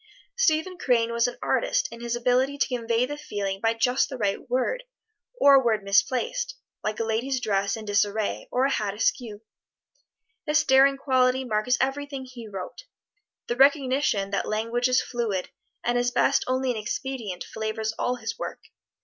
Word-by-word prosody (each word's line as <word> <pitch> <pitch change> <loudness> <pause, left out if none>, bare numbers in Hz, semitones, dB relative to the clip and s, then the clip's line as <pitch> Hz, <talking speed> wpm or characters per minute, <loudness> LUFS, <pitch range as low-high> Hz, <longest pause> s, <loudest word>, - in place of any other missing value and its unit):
Stephen 365 -5 +1
Crane 235 -3 +2
was 235 +1 +2
an 245 - -6
artist - - +1
in 235 0 -10
his 235 0 -2
ability 255 +3 +1
to - - +1
convey 230 0 +1
the 290 +3 -6
feeling 200 -7 -4
by 225 0 +2
just 250 +3 +2
the 265 - -6
right 205 0 -2
word, 260 - 0 0.6
or 280 0 +7
a 270 -1 +6
word 220 -4 +1
misplaced, 475 - +1 0.3
like 215 0 -2
a - - +1
lady's 235 +4 -1
dress 200 -3 0
in 220 - -8
disarray, 205 +1 0
or 255 +2 +2
a 275 - +1
hat 205 -5 -1
askew. 220 0 -1 1.0
This 305 +1 +3
daring 270 0 +5
quality 260 -1 +2
marks 240 +1 +1
everything 275 0 -2
he 245 -3 -10
wrote. 195 - -8 0.6
The 240 - -2
recognition 265 -7 +3
that 200 - -1
language 230 +3 0
is 255 0 +2
fluid, 225 -7 -3 0.3
and 245 0 +1
at 245 0 0
best 275 0 +3
only 255 0 +1
an 235 - -3
expedient, 220 -2 -4
flavors 220 0 -3
all 250 - 0
his 230 -1 -6
work. - - -5
245 Hz, 170 wpm, -26 LUFS, 220-265 Hz, 1.0 s, or